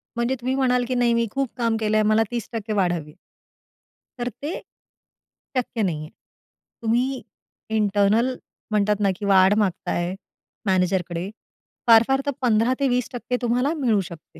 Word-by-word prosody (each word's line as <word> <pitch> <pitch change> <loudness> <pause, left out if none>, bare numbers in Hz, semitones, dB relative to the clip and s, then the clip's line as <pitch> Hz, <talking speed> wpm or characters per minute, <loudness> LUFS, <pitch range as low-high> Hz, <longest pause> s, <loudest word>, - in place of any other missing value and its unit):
म्हणजे 235 +2 0
तुम्ही 260 +2 -1
म्हणाल, 250 -2 +2
की 255 - -1
नाही 240 -1 +3
मी 235 0 +1
खूप 275 -2 -1
काम 230 -2 +1
केलंय 215 0 +2
मला 225 +1 +4
30% 225 -2 -4
वाढावी. 175 -6 -1 1.1
तर 245 +1 -1
ते 305 - -2 1.1
शक्य 240 -2 -1
नाही 175 -5 0
आहे. 155 - -8 0.7
तुम्ही 250 +4 +1 0.6
इंटरनल 210 +4 +2 0.4
म्हणतात 210 0 +2
ना, 200 - +3
की 205 - -6
वाढ 190 0 +5
मागत 190 -4 0
आहे, 175 +2 -1 0.5
मॅनेजरकडे. 180 -1 0 0.6
फार-फार 235 +4 +6
तर 285 - +1
15 235 +1 +3
ते 275 - +2
20% 250 0 -1
तुम्हाला 250 +6 +1
मिळू 235 -9 +2
शकते. 165 -2 -13
225 Hz, 140 wpm, -23 LUFS, 200-250 Hz, 1.1 s, फार-फार